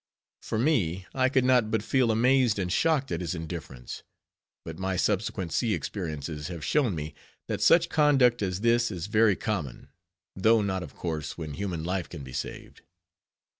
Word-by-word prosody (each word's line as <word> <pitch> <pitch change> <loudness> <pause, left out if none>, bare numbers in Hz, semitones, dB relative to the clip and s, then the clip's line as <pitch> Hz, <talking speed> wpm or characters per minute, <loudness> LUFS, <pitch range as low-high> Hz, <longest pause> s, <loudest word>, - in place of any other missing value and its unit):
For - - -3
me, 100 - +1
I 130 -1 +2
could 130 -1 +2
not 125 -4 +4
but 110 -1 0
feel 130 -2 +2
amazed 120 0 +3
and 90 -2 -1
shocked 155 -5 +1
at 85 - -2
his 85 0 -3
indifference; 80 -6 -7 0.6
but 80 +1 -7
my 95 0 -1
subsequent 95 -2 -1
sea 115 -4 +1
experiences 75 -5 -5
have 85 -4 -6
shown 130 - +1
me, 75 0 -5 0.3
that - - -3
such 170 0 +5
conduct 140 -7 +3
as 95 -1 -2
this 120 +1 +3
is 90 -5 -5
very 110 -1 +3
common, 90 - -4 0.5
though 110 +3 +4
not, 95 -2 -1
of 75 -5 -9
course, 80 -4 -4
when 80 -3 -5
human 90 -2 -4
life 90 +1 -2
can 75 -5 -8
be 65 -1 -10
saved. 70 - -6
100 Hz, 170 wpm, -27 LUFS, 85-120 Hz, 0.6 s, such